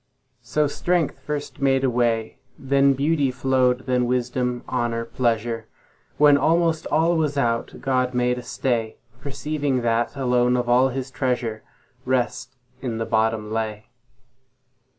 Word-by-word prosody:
So 150 0 0
strength 165 0 0
first 145 +1 -5
made 135 -1 +2
a 135 - +3
way, 115 -2 0 0.2
Then 140 +1 +3
beauty 145 0 +1
flow'd, 130 0 +1
then 125 -1 +1
wisdom, 125 0 -1
honour, 120 -2 -1
pleasure; 115 -1 -1 0.5
When 145 -1 +6
almost 165 +2 +2
all 165 +3 +2
was 150 -3 0
out, 115 -3 0
God 130 -1 0
made 125 0 +1
a - - -6
stay, 120 -2 -2 0.2
Perceiving 140 -1 -2
that, 120 +2 0
alone 125 -2 +2
of 125 -1 -1
all 125 +2 +4
His 130 0 -5
treasure, 125 -5 -2 0.4
Rest 125 0 -1 0.3
in 120 -4 -3
the 115 - -2
bottom 110 -1 0
lay. 110 -1 -3
125 Hz, 135 wpm, -23 LUFS, 120-140 Hz, 0.5 s, When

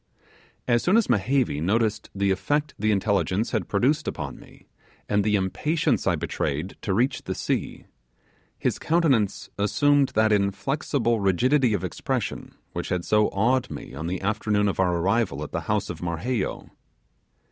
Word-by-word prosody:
As 120 -1 +3
soon 185 +5 +3
as 225 - +2
Mehevi 115 - +1
noticed 110 +4 0
the 100 0 +1
effect 145 +11 0
the 110 +1 +2
intelligence 100 +1 +1
had 110 -6 -1
produced 135 +9 +1
upon - - -5
me, - - -17 0.4
and 105 0 +2
the 105 0 +2
impatience 145 - 0
I - - +3
betrayed 75 +6 -3
to 105 - -2
reach 125 +5 +1
the - - -3
sea, - - -3 0.7
his - - -1
countenance 140 - +1
assumed 145 +7 +3
that 110 0 +4
inflexible 115 +4 0
rigidity 120 +6 +3
of 95 - -3
expression 90 - -3 0.2
which - - -4
had 90 -1 -1
so 105 0 +3
awed 125 +5 +1
me - - -8
on 80 +4 -5
the 90 +2 -3
afternoon 105 0 +1
of 100 - -2
our 90 -2 +2
arrival 95 -5 0
at 75 - -7
the - - -2
house - - +1
of - - -6
Marheyo. 90 +7 -3
105 Hz, 160 wpm, -25 LUFS, 95-125 Hz, 0.7 s, that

